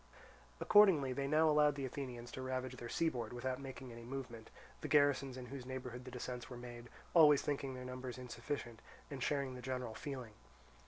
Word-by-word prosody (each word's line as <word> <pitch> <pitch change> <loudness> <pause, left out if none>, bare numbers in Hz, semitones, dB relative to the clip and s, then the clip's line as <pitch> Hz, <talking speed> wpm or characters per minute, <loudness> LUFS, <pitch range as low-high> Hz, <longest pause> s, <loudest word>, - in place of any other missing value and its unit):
Accordingly 175 -11 +6
they 140 +1 -1
now 155 +2 +4
allowed 150 -1 +5
the 140 -1 -3
Athenians 125 -2 -5
to 130 - -5
ravage 130 0 -3
their 120 - -6
seaboard, 125 -9 0
without 130 +2 -2
making 130 -2 -7
any 115 0 -9
movement, 120 -3 -6 0.3
the - - -3
garrisons 140 -3 +3
in 125 - -6
whose 130 +1 -7
neighbourhood 125 -1 -6
the - - -6
descents 125 0 -5
were 125 - -7
made 120 -1 -9 0.2
always 150 -4 +7
thinking 140 -2 -2
their 125 0 -7
numbers 125 0 -5
insufficient, 120 -1 -5 0.3
and 135 -2 -5
sharing 140 -1 0
the 125 - -7
general 125 -3 -3
feeling. 130 -5 -6
130 Hz, 180 wpm, -37 LUFS, 125-140 Hz, 0.3 s, always